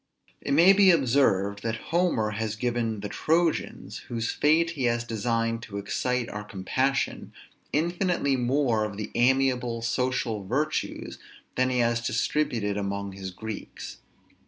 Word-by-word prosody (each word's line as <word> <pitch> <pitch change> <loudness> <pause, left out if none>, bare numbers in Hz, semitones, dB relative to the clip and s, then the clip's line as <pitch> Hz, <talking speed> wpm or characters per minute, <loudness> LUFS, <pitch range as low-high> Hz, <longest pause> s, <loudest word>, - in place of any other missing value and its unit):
It 140 - -1
may 175 +5 +7
be 195 -1 +6
observed, 115 - +3
that 115 0 -2 0.2
Homer 170 -12 +2
has 110 0 -3
given 115 -2 -1
the 105 - -3
Trojans, 165 +8 0
whose 115 -1 -2
fate 165 +3 +3
he 140 -6 -2
has 120 0 +1
designed 115 0 -1
to 100 -3 -7
excite 120 +4 -1
our 105 0 -6
compassion, 130 +8 -1 0.4
infinitely 170 -2 +1
more 125 -3 +1
of 105 -2 -4
the 105 0 -5
amiable, 125 -2 +2
social 120 -3 -1
virtues 135 +10 -2 0.3
than 130 0 +1
he 125 - 0
has 115 -1 +2
distributed 115 -3 0
among 100 0 -3
his 95 0 -7
Greeks. 110 +3 -8
120 Hz, 135 wpm, -27 LUFS, 105-135 Hz, 0.4 s, may